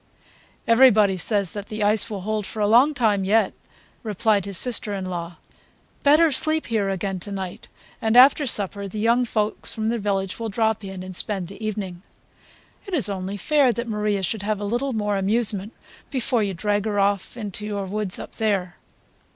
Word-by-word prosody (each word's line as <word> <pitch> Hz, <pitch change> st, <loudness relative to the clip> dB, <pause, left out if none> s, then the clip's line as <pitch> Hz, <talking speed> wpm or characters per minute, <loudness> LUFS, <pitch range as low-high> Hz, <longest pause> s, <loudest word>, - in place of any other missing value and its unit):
'" -, -, -30 dB, 0.2 s
"Everybody 230 Hz, -5 st, +5 dB
says 195 Hz, 0 st, +1 dB
that 205 Hz, -1 st, -7 dB
the 215 Hz, -1 st, -3 dB
ice 210 Hz, +2 st, +4 dB
will 205 Hz, -3 st, -5 dB
hold 210 Hz, 0 st, -2 dB
for 220 Hz, -, -7 dB
a 210 Hz, -, +2 dB
long 250 Hz, +8 st, +5 dB
time 210 Hz, -6 st, +1 dB
yet," 205 Hz, +1 st, +2 dB, 0.5 s
replied 210 Hz, -2 st, 0 dB
his 200 Hz, -2 st, -5 dB
sister 225 Hz, -3 st, 0 dB
in 190 Hz, -1 st, -4 dB
law. 175 Hz, -2 st, -5 dB, 0.7 s
"Better 305 Hz, +3 st, +5 dB
sleep 310 Hz, +3 st, +1 dB
here 215 Hz, -4 st, -1 dB
again 195 Hz, 0 st, -3 dB
to 205 Hz, -, -6 dB
night, 190 Hz, -2 st, -6 dB, 0.3 s
and 220 Hz, +2 st, +2 dB
after 275 Hz, +3 st, +7 dB
supper 200 Hz, -2 st, -1 dB
the 195 Hz, -, -8 dB
young 235 Hz, +3 st, +2 dB
folks 215 Hz, -2 st, -1 dB
from 220 Hz, -1 st, -1 dB
the 235 Hz, 0 st, -1 dB
village 195 Hz, -1 st, -2 dB
will 225 Hz, -1 st, -3 dB
drop 220 Hz, +1 st, 0 dB
in 190 Hz, -1 st, -7 dB
and 185 Hz, 0 st, -8 dB
spend 190 Hz, -2 st, -1 dB
the 200 Hz, +3 st, -10 dB
evening. 195 Hz, -5 st, -4 dB, 0.9 s
It 385 Hz, -, -2 dB
is 260 Hz, -9 st, +3 dB
only 195 Hz, 0 st, -4 dB
fair 280 Hz, +4 st, +3 dB
that 235 Hz, +1 st, -4 dB
Maria 210 Hz, -2 st, -1 dB
should 200 Hz, +4 st, -2 dB
have 210 Hz, 0 st, -2 dB
a 205 Hz, -, -4 dB
little 245 Hz, +6 st, -1 dB
more 210 Hz, -2 st, -1 dB
amusement 205 Hz, 0 st, +1 dB, 0.4 s
before 250 Hz, -3 st, 0 dB
you 200 Hz, -3 st, -2 dB
drag 205 Hz, +3 st, -1 dB
her 205 Hz, -2 st, -1 dB
off 200 Hz, +3 st, 0 dB
into 210 Hz, -1 st, -5 dB
your 200 Hz, -2 st, -3 dB
woods 200 Hz, -1 st, -2 dB
up -, -, -8 dB
there." 195 Hz, -5 st, -1 dB
210 Hz, 190 wpm, -23 LUFS, 195-225 Hz, 0.9 s, after